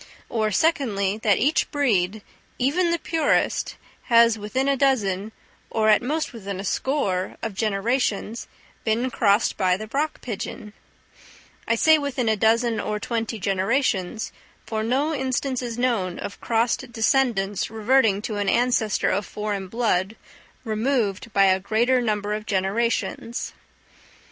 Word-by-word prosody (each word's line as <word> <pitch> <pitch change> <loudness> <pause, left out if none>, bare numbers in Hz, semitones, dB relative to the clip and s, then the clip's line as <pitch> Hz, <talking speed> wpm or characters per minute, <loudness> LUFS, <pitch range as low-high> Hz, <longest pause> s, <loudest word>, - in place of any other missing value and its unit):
Or, 220 -2 0
secondly, 215 - +1
that 210 -3 +3
each 290 +6 +1
breed, 215 -8 0 0.3
even 325 +8 +1
the 340 - +1
purest, 325 -1 0 0.3
has 230 -1 +5
within 225 +6 -2
a 280 - +3
dozen, 220 -7 +1 0.4
or 220 -1 +1
at 210 - +5
most 300 +4 -2
within 200 -4 -6
a - - -4
score, 200 -5 -1
of 225 - -3
generations, 220 +2 -1 0.4
been 235 +3 0
crossed 205 -1 +2
by 185 -2 +2
the 215 - -6
rock 300 +2 -1
pigeon: 210 -2 -6 0.9
I 230 - +2
say 315 +6 +5
within 270 -4 -2
a 220 - +3
dozen 225 +2 +2
or 210 0 -2
twenty 225 0 -3
generations, 195 +1 0 0.3
for 220 -1 -2
no 270 +8 0
instance 260 -1 -1
is 240 -2 -5
known 225 -8 0
of 200 - -7
crossed 235 +2 0
descendants 225 -5 +1
reverting 220 -2 +2
to 215 -2 -3
an 200 -1 0
ancestor 235 -3 +2
of 200 +2 -1
foreign 205 -2 -4
blood, 210 -2 0 0.5
removed 225 -2 -1
by 195 - +4
a 190 0 +4
greater 235 +6 +2
number 210 -2 -1
of 215 0 -5
generations. 230 +4 -1
225 Hz, 140 wpm, -24 LUFS, 205-255 Hz, 0.9 s, has